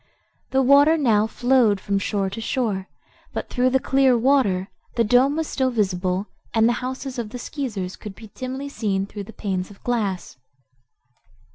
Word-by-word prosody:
The 265 0 +2
water 285 +5 +6
now 220 -7 +3
flowed 240 -4 +3
from 200 0 -1
shore 195 -1 -1
to 225 - -5
shore, 215 -6 -1 0.4
but - - -5
through 255 0 +2
the 265 +1 +2
clear 265 -2 +3
water 225 -7 +2 0.3
the 235 - +3
dome 250 +6 +4
was 320 0 -1
still 260 -1 0
visible 190 -4 0 0.3
and 225 0 +5
the 240 - +3
houses 260 0 -4
of 225 -3 -4
the 250 - -6
Skeezers 220 -9 -4
could 210 -3 -9
be 220 -2 -13
dimly 260 +2 -5
seen 200 -8 -1
through 205 0 -8
the 225 - -11
panes 190 -4 -3
of 205 - -16
glass. 205 - -2
230 Hz, 170 wpm, -23 LUFS, 200-260 Hz, 0.4 s, water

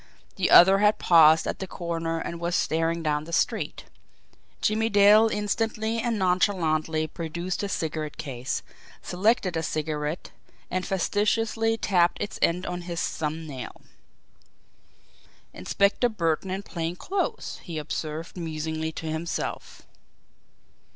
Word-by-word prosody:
The - - +1
other 190 +3 +8
had 210 +1 +4
paused 160 -2 +6
at - - -3
the 190 - -4
corner 165 -2 -3
and 170 +1 -5
was 170 +1 -1
staring 165 +1 0
down 150 -1 0
the 170 - -9
street. - - -1 0.8
Jimmie 220 +1 +1
Dale 205 +2 +6
instantly 220 +2 -1
and 230 -1 -1
nonchalantly 165 -4 +1
produced 170 +3 -4
his 200 -1 -3
cigarette 155 -2 -3
case, 130 -3 -4 0.4
selected 190 -1 +1
a 160 - 0
cigarette, 155 0 -3 0.4
and 185 0 -2
fastidiously 225 +4 +1
tapped 180 -5 +2
its 205 - -4
end 180 +3 +2
on 175 0 -4
his 170 -1 -3
thumb 160 +1 -3
nail. 130 -5 -8 1.7
"Inspector 200 +5 +1
Burton 175 -3 -1
in 190 +2 -3
plain 170 -2 -4
clothes," 380 - -3
he 170 -3 -7
observed 155 +1 -5
musingly 160 -1 -3
to 160 - -7
himself. 160 +2 -4
170 Hz, 125 wpm, -26 LUFS, 160-200 Hz, 1.7 s, other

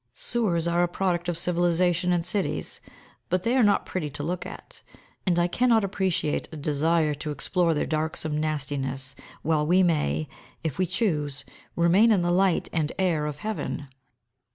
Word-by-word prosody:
Sewers 220 - +1
are 170 +1 +2
a 175 - +3
product 175 -1 -1
of 170 - -1
civilisation 175 +1 +1
in 175 -1 +1
cities, 195 +3 -2 0.5
but 185 0 +1
they 235 +2 +1
are 260 - +4
not 205 -3 +3
pretty 165 -5 -3
to 145 +1 -6
look 175 +3 -3
at, - - -8 0.5
and 175 -2 +3
I 175 - +4
cannot 230 +3 +3
appreciate 190 -6 -1
a 160 - -7
desire 150 +2 +1
to 150 +1 -5
explore 170 +2 +1
their 150 - 0
darksome 155 -1 -2
nastiness 135 -3 -2 0.3
while 155 -1 +2
we 185 +3 +5
may, 80 - +1 0.4
if 160 -2 -3
we 185 - +2
choose, 150 - -1 0.3
remain 180 +7 +5
in 195 -5 +3
the 175 - +1
light 185 0 +2
and 160 -2 0
air 165 -6 +1
of 150 -1 -5
heaven. 170 -9 -3
170 Hz, 170 wpm, -26 LUFS, 150-185 Hz, 0.5 s, we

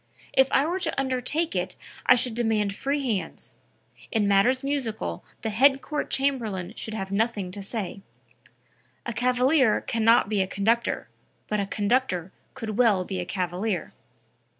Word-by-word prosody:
If 265 0 +4
I 275 - +4
were 350 +4 -1
to 360 - -1
undertake 270 +5 -1
it - - -2 0.3
I - - +8
should 245 -1 +1
demand 220 -3 +1
free 280 +3 -1
hands. 165 - -4 0.5
In 215 -2 +2
matters 220 +7 +3
musical 275 -6 -3 0.2
the 220 - -1
Head 270 +5 +4
Court 300 -1 -3
Chamberlain 220 -9 -1
should 220 - -4
have 195 -2 -4
nothing 205 -3 0
to 200 +2 -5
say; 200 -1 -4 1.0
a 235 - -3
cavalier 250 +1 +3
can 230 -1 -2
not 230 -1 +5
be 205 -2 +1
a 190 - 0
conductor, 225 +5 0 0.4
but 210 - -1
a 200 - -1
conductor 205 -4 0 0.2
can 225 -5 -5
well 215 -7 +4
be 190 -1 -4
a 180 - -3
cavalier." 185 +1 -2
225 Hz, 155 wpm, -26 LUFS, 200-260 Hz, 1.0 s, I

